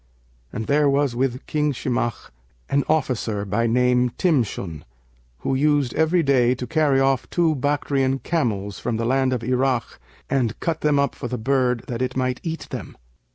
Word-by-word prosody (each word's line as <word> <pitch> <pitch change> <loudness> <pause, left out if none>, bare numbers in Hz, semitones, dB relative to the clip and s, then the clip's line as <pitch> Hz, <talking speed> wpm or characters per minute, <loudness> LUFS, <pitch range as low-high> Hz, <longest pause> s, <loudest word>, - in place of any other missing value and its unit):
And 110 - -4
there 145 +2 +3
was 140 -3 +1
with 130 +1 -1
King 150 -1 0
Shimakh 120 -3 -2 0.4
an 140 0 +3
officer, 120 -9 0
by 110 +4 0
name 125 +1 +3
Timshun, 110 - 0 0.6
who - - -1
used 145 -2 +2
every 160 +3 +2
day 130 -3 +3
to 125 - -5
carry 145 0 +2
off 135 -1 +1
two 170 -2 +2
Bactrian[FN#563] 135 -1 0
camels 105 - -1
from 120 -2 -2
the 115 - -1
land 130 +1 +2
of 125 -2 -2
Irak 125 - 0 0.3
and 120 -5 0
cut 165 -2 -2
them 150 -1 +2
up 140 0 +1
for - - -6
the 125 - -3
bird 125 0 +1
that 120 0 -4
it 130 0 -2
might 130 -1 0
eat 165 -1 -5
them. - - -7
130 Hz, 170 wpm, -23 LUFS, 120-145 Hz, 0.6 s, there